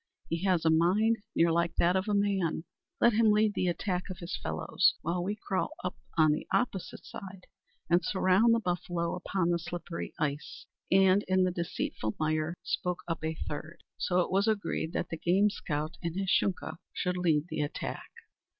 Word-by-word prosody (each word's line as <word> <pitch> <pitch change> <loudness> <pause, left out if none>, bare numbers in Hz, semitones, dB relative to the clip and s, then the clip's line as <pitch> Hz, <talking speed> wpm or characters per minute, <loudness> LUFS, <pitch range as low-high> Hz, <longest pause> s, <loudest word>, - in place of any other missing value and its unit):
He 165 +2 -2
has 180 -4 +2
a 160 - +5
mind 195 +8 +3 0.2
near 165 0 +4
like 170 0 +1
that 175 +2 +3
of 190 +2 0
a 210 - +1
man. 195 -6 +1 0.4
Let 235 - +5
him 220 0 +4
lead 210 0 +4
the 185 - 0
attack 180 +2 -1
of 185 - -6
his 170 0 -5
fellows, 80 0 +1
while 175 +2 -1
we 205 +3 -1
crawl 190 -2 -2
up 180 - -2 0.2
on 155 -1 +6
the 150 - -2
opposite 200 -7 -1
side 190 -1 -9 0.4
and 175 +2 +3
surround 195 +4 +4
the - - +2
buffalo 175 -3 -2
upon 180 -1 -1
the 170 - +1
slippery 175 0 -6
ice 150 -1 -3 0.3
and 190 +1 +5
in 185 0 +3
the 185 - +2
deceitful 170 -10 -3
mire," 155 +1 0
spoke 180 -1 -2
up 165 -2 -3
a 160 0 -1
third. 155 +3 -6 0.2
So 180 0 +2
it - - -2
was 195 +3 +2
agreed 205 -6 0
that - - -2
the 165 - -4
game 195 +6 +3
scout 155 -4 -3
and 170 -2 -3
his 195 -1 -1
Shunka 190 -4 0 0.2
should 180 -1 -1
lead 160 -4 +2
the 155 - -2
attack. 145 - -4
180 Hz, 185 wpm, -30 LUFS, 165-195 Hz, 0.4 s, on